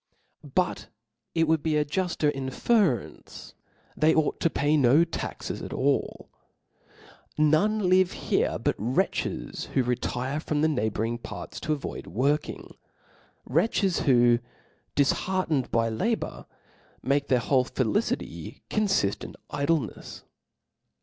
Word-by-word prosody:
But - - 0 0.5
it 165 -1 +3
would 160 -1 +2
be 155 -1 +1
a 150 - +2
jufter 170 -2 0
inference, 135 - -1 0.4
that - - -17
they 155 +1 +5
ought 155 -1 +1
to 165 - +2
pay 145 0 +1
no 140 +3 +5
taxes 170 - -5
at - - -6
all. - - 0 0.6
' - - -28 0.4
None 180 +7 +3
live 185 0 +4
here - - 0
but - - 0
wretches 120 +6 -1
who 130 - +4
retire 125 +3 -2
frofn 150 -1 -1
the - - +5
neighbour 110 -7 0
ing 120 +1 -3
parts - - -8
to 155 - -1
avoid 145 - -6
working; 140 - -1 0.7
wretches, 180 - +1
who, 120 -3 +4 0.6
dif 140 -1 +4
hcartcned 175 -8 -1
by 115 0 +2
labour, 115 - -2 0.6
make 140 +2 +1
their 130 - +3
whole 125 +2 +2
felicity 135 - -2
confift 195 - +1
in - - -8 0.2
idlcncfs. 145 -3 -2
145 Hz, 130 wpm, -27 LUFS, 125-165 Hz, 0.7 s, they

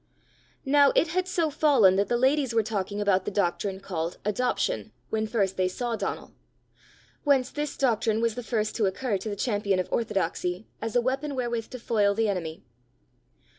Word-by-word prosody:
Now 280 0 +5
it 330 - +3
had 370 +2 0
so 335 -4 0
fallen 265 -11 +5
that 200 - +2
the 240 - +1
ladies 265 -1 +2
were 225 - +4
talking 205 -1 -3
about 200 -2 +2
the - - -1
doctrine 195 0 -1
called 170 -3 -4
Adoption 210 - -1 0.2
when 220 0 0
first 200 -4 0
they 185 -1 +2
saw 235 +5 -2
Donal; 220 - -4 0.9
whence 275 -3 +3
this 295 -1 -4
doctrine 225 -4 +1
was 230 -1 +1
the 245 - -5
first 215 -2 -2
to 215 -4 +2
occur 200 +1 -1
to 215 - -5
the 205 - -3
champion 205 -3 0
of 185 - -1
orthodoxy 185 -2 -1 0.2
as 225 +1 -4
a 245 - +5
weapon 270 +3 -2
wherewith 240 -3 -2
to 255 - -7
foil 205 -3 +2
the 225 +1 +1
enemy. 165 -5 -4
220 Hz, 180 wpm, -27 LUFS, 195-255 Hz, 0.9 s, Now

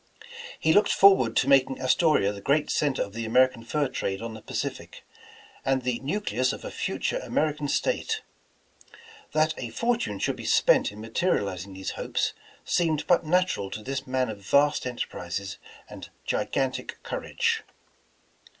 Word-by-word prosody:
He 160 - +3
looked 205 - +4
forward 190 -13 +5
to 130 - +3
making 135 -1 +4
Astoria 130 - +3
the 100 - -9
great 145 +6 +1
cen 145 -3 +1
ter - - 0
of 100 - -10
the 115 +1 -4
American 125 +1 +3
fur 145 +4 0
trade 95 -6 -3
on 115 0 -6
the 110 - -9
Pacific, - - -5 0.6
and 135 -1 +1
the 125 -1 -1
nucleus 135 - -1
of - - -7
a - - -5
future - - -2
American 150 -1 -1
State. 445 - 0 1.1
That 155 +1 +3
a 120 - -4
fortune 235 - -1
should - - -1
be - - -8
spent - - +4
in 105 +1 -10
materializing 100 - -1
these 95 0 -4
hopes, - - -2 0.3
seemed 160 -4 +1
but 175 -3 +3
natural 180 - +1
to 105 - -7
this 135 +2 -4
man 130 -1 0
of 105 -2 -6
vast 140 +6 +2
enterprises 100 -5 -5 0.3
and - - -10 0.2
gigan* 135 -1 0
tic - - -6
courage. - - -1
130 Hz, 160 wpm, -26 LUFS, 110-155 Hz, 1.1 s, forward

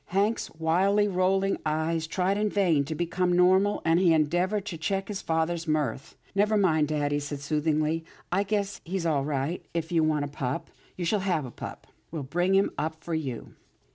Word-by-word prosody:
Hank's 200 +5 0
wildly 190 +6 +2
rolling 195 +1 +1
eyes 160 +1 0
tried 185 +3 0
in 210 +1 +1
vain 175 -9 +2
to 160 +2 -4
become 175 +2 0
normal, 185 +3 +4
and 165 +1 +4
he 180 -3 +5
endeavoured 175 +7 +1
to 180 -6 -5
check 195 +4 -1
his 200 -2 -4
father's 165 +1 -1
mirth. 145 -4 -1
" - - -30
Never 210 +2 +3
mind, 160 -6 +3
dad," 145 -1 0
he 145 - +1
said 145 0 -5
soothingly, 155 +2 0
" - - -28
I 190 +3 +2
guess 200 0 -2
he's 180 0 -3
all 150 -4 +1
right. 145 +4 -2
If 165 0 -2
you 165 -2 +3
want 155 -2 +1
a - - -4
pup, 140 -3 -4 0.3
you 175 - -2
shall 210 +5 +2
have 180 -7 0
a 125 - -8
pup. - - -8 0.2
We'll 155 -3 -4
bring 175 +7 +1
him 195 - +3
up 160 +1 -1
for 170 - -4
you." 135 -8 -4
165 Hz, 200 wpm, -27 LUFS, 155-190 Hz, 0.3 s, he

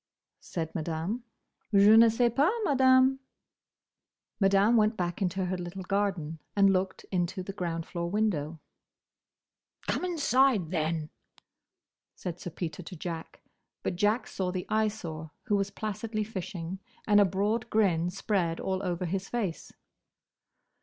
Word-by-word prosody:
said 160 -2 -5
Madame. 165 +8 -3 0.5
"Je 205 +1 +7
ne 230 +1 +8
sais 235 +1 +2
pas, 290 +7 +4
Madame." 260 -3 +4 1.2
Madame 195 +3 +4
went 215 0 +3
back 175 +1 -2
into 190 0 0
her 185 +1 -2
little 180 +2 -6
garden, 185 -5 -1 0.2
and 195 -1 +5
looked 190 0 -1
into 180 0 -1
the 195 - -6
ground 170 -4 -3
floor 170 -1 -4
window. 170 -7 -1 1.3
"Come - - -1
inside, 270 - +2
then!" 160 -2 -1 1.0
said 175 -1 -6
Sir - - -5
Peter 165 0 -5
to 180 +2 -9
Jack. 165 0 -7 0.4
But - - -1
Jack 210 +5 +2
saw 185 -2 -3
the 180 -1 -3
Eyesore, 205 -8 -1
who 210 -5 +1
was 200 0 0
placidly 215 +1 -3
fishing, 185 -3 -5 0.3
and 205 -1 +5
a - - +8
broad 205 +4 0
grin 175 -6 +2
spread 180 -3 -1
all 190 0 -1
over 180 -1 -2
his 190 +3 -3
face. 205 -9 -3
190 Hz, 135 wpm, -29 LUFS, 175-215 Hz, 1.3 s, ne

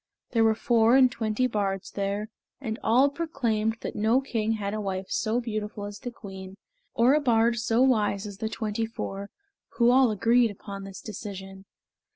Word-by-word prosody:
There 225 -2 +3
were 220 -1 +4
four 230 0 +3
and 260 -2 +6
twenty 225 +1 -1
bards 200 -5 -2
there, 200 +2 -2 0.3
and 225 -4 -4
all 250 +5 +4
proclaimed 230 -9 -1
that - - -5
no 220 +4 +3
king 225 -5 -1
had 205 -2 -3
a 215 - -2
wife 190 -1 -3
so 220 +2 0
beautiful 215 -3 -4
as 205 0 -8
the 245 - -5
queen, 190 -4 -10 0.4
or 240 +4 +5
a 300 - +4
bard 235 -3 +3
so 230 +2 +2
wise 215 -5 +2
as 205 -1 -8
the 220 -1 -2
twenty 220 0 -2
four, 200 -3 -6 0.5
who 235 0 +5
all 260 -1 +5
agreed 230 +3 +3
upon 200 -1 -8
this 195 -1 -9
decision. 195 -2 -8
220 Hz, 180 wpm, -27 LUFS, 205-235 Hz, 0.5 s, and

